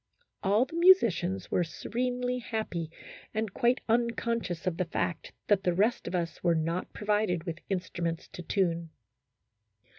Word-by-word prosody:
All 205 +6 +3
the 265 - -15
musicians 210 - +4
were 180 - +3
se 165 -2 -8
renely 250 +1 -1
happy 200 -9 -3 0.5
and 220 -3 -1
quite 245 0 +2
unconscious 230 -5 0
of 180 -3 0
the 185 - 0
fact 170 0 -2
that 205 -2 +3
the 180 -2 +1
rest 215 +6 +2
of - - -2
us 170 -1 -3
were 170 -2 +4
not 165 +3 -1
provided 210 -5 0
with 170 -2 -5
instruments 175 -3 -2
to - - -8
tune. 170 -2 0
190 Hz, 150 wpm, -30 LUFS, 170-230 Hz, 0.5 s, musicians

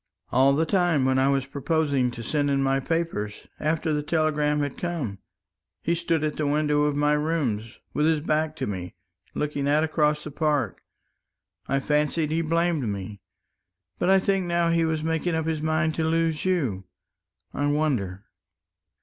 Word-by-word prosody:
"All 135 +2 +5
the 160 +3 +2
time 175 -6 +2
when 130 0 +2
I 135 +1 +3
was 135 -1 +1
proposing 140 -2 0
to 120 -1 -7
send 145 +4 0
in 135 -1 +2
my 135 0 +2
papers, 135 -9 -2
after 155 +1 0
the 150 - 0
telegram 150 -1 +1
had 145 -2 -2
come, 150 - -3 0.6
he 170 - +1
stood 170 -2 0
at 155 -1 -1
the 150 - 0
window 150 0 +2
of 150 -1 0
my 150 +1 +2
rooms 145 -8 -1 0.2
with 150 +1 +2
his 160 -1 +3
back 155 0 0
to - - -3
me, 90 -3 -5 0.4
looking 145 -1 -1
out 150 +2 +3
across 150 -1 +1
the 150 - -7
park. 145 - 0 0.9
I 135 - +1
fancied 150 +2 0
he 165 +1 +1
blamed 165 -5 +1
me. 100 0 -6 0.8
But 175 - +1
I 195 - +7
think 190 -1 +1
now 170 -1 +2
he 165 0 +2
was 160 -1 -1
making 160 +1 0
up 160 -1 -1
his 160 -2 -1
mind 155 0 +1
to 160 - -1
lose 160 0 0
you.... 130 - 0 0.7
I 145 - 0
wonder." 125 -11 -1
150 Hz, 175 wpm, -25 LUFS, 140-160 Hz, 0.9 s, I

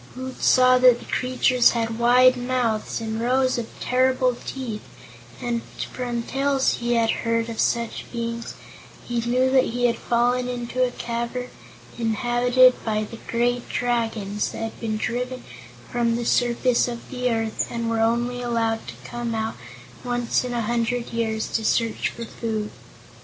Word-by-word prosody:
Woot 260 0 -7
saw 255 0 +5
that 250 -1 +7
the - - -12
creatures 255 -1 +3
had 225 0 -2
wide 250 +2 +6
mouths 245 -4 -1
and 220 0 -3
rows 255 +1 +2
of 230 - -4
terrible 255 0 +2
teeth 240 -6 -4 0.6
and, 235 -1 -2 0.3
from 240 -2 -3
tales 275 +1 +1
he 240 0 0
had 230 -1 +3
heard 230 0 0
of 225 - -6
such 235 -1 -1
beings, 235 -1 -4 0.5
he 240 -1 -1
knew 250 +2 +2
he 245 0 -1
had 235 - +1
fallen 245 +1 +1
into 245 +1 -1
a 250 - +2
cavern 235 +1 -4 0.5
inhabited 240 +3 +3
by 215 -1 0
the 230 +2 -9
great 240 +1 0
Dragons 225 -4 -1
that - - -6
had 225 - -6
been 220 -2 -2
driven 250 +3 -3 0.5
from 235 -1 +1
the 235 0 -2
surface 245 +1 +2
of 235 -1 -6
the 250 -1 -1
earth 225 -1 -1
and 235 -1 -3
were 230 0 0
only 240 +2 +1
allowed 230 -2 -1
to - - -7
come 240 -1 -4
out 220 0 -2 0.5
once 245 -1 0
in 250 - -4
a 240 -1 -1
hundred 235 +1 -1
years 220 -1 -1
to 225 - -1
search 230 +1 +1
for 235 - -7
food. 220 -2 -4
240 Hz, 160 wpm, -24 LUFS, 230-250 Hz, 0.6 s, that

